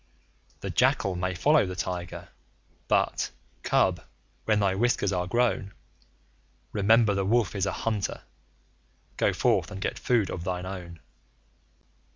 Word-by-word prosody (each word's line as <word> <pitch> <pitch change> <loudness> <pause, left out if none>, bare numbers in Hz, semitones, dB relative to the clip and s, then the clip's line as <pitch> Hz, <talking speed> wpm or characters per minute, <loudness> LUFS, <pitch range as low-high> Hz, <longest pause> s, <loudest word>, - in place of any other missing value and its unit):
The - - -4
jackal 95 -2 +2
may 90 +1 -2
follow 145 - +4
the 90 - -5
Tiger, 90 -2 -5 0.6
but, - - +1 0.3
Cub, - - +2 0.4
when 110 -1 +3
thy 100 -2 +2
whiskers 100 -2 +1
are 90 -1 -1
grown, 115 -2 0 1.0
Remember 110 +1 +4
the 100 0 0
Wolf 110 +1 +2
is 100 0 0
a - - 0
hunter 110 -3 -2 0.9
go - - +3
forth - - +1
and 100 -2 -7
get 95 - -3
food 115 -6 +1
of 85 - -5
thine 90 0 -3
own. 90 -3 -8
95 Hz, 135 wpm, -27 LUFS, 90-110 Hz, 1.0 s, follow